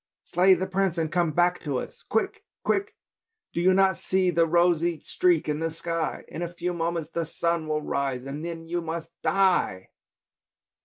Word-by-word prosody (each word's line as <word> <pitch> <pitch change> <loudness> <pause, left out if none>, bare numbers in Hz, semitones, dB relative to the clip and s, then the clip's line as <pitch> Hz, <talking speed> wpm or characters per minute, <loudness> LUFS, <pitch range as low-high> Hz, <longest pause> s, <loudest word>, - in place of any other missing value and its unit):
Slay 185 +2 +4
the 185 +2 -2
prince 190 -2 0
and 160 -1 -1
come 175 -3 +2
back 175 +3 +2
to 145 -5 -2
us! - - -6
Quick! 220 - 0 0.2
Quick! 400 +3 0 0.6
do 170 - -1
you 185 +2 +5
not 190 -1 +4
see 185 -1 +1
the 165 0 +3
rosy 170 -1 +2
streak 360 -2 +2
in 150 0 -1
the 165 0 0
sky? 165 0 -3
In - - -7
a 175 -1 -3
few 175 +1 -3
moments 165 -1 -2
the 170 - -1
sun 170 0 -1
will 150 0 -1
rise 135 -3 -2
and 140 +3 -5
then 165 -1 -5
you 175 +1 -1
must 165 0 -5
die! 185 - +2
170 Hz, 185 wpm, -26 LUFS, 160-180 Hz, 0.6 s, you